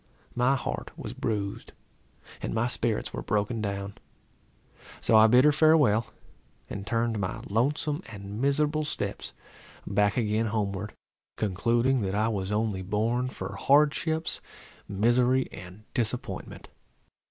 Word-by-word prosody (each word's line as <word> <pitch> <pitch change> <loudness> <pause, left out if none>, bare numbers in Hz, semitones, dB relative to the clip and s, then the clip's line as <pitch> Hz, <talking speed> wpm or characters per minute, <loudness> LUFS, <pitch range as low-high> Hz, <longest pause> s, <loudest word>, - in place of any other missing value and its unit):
My 125 +3 +3
heart 130 - -4
was - - -6
bruised, 100 -3 -3 0.7
and - - -3
my 115 +1 +2
spirits 120 -2 -1
were - - -4
broken 105 +2 -1
down; 100 -1 -4 1.0
so 115 - +2
I 110 0 +8
bid 125 +4 +6
her 150 - +7
farewell, 145 -8 +4 0.6
and 100 0 -6
turned 115 -1 0
my 95 -2 -3
lonesome 145 - 0
and 100 0 -7
miserable 150 +2 +2
steps 150 - -4 0.5
back 105 -1 +1
again 110 -1 +1
homeward, 105 -1 -2 0.4
concluding 115 +6 +1
that 95 -1 -1
I 110 +2 +2
was 100 -3 -2
only 105 -2 0
born 115 +6 0
for - - -6
hardships, 150 +3 +2 0.5
misery, 120 +5 +2
and 90 +3 -11
disappointment. 120 0 -3
115 Hz, 125 wpm, -28 LUFS, 105-130 Hz, 1.0 s, I